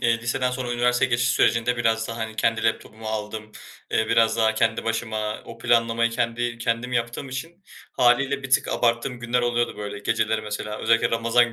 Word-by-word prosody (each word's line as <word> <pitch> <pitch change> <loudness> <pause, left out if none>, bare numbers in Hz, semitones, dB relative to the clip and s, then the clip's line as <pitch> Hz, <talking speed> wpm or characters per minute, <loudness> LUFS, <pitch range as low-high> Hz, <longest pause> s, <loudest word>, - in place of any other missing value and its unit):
eee, 120 -2 +2
liseden 125 +2 -1
sonra 125 -1 -3
üniversiteye 125 +1 +2
geçiş 120 0 +2
sürecinde 120 +1 +2
biraz 115 -1 +1
da, 115 - -5
hani, 110 -1 -5
kendi 115 0 +1
laptopumu 110 0 -2
aldım, 110 0 -5 0.4
eee, 110 - +1
biraz 115 0 +3
daha 110 -1 +2
kendi 115 0 +1
başıma 110 -2 -2
o 115 - -11
planlamayı 115 0 +2
kendi 120 +1 -2
kendim 115 +2 -1
yaptığım 120 +3 -2
için 165 +8 -7 0.3
hâliyle 135 +3 +2
bir 135 - -7
tık 130 - +3
abarttığım 120 +1 0
günler 120 +1 0
oluyordu 120 0 0
böyle. 105 0 -5
Geceleri 110 +1 0
mesela 105 0 -5
özellikle 115 0 +2
Ramazan 115 +1 +2
115 Hz, 175 wpm, -24 LUFS, 110-120 Hz, 0.4 s, biraz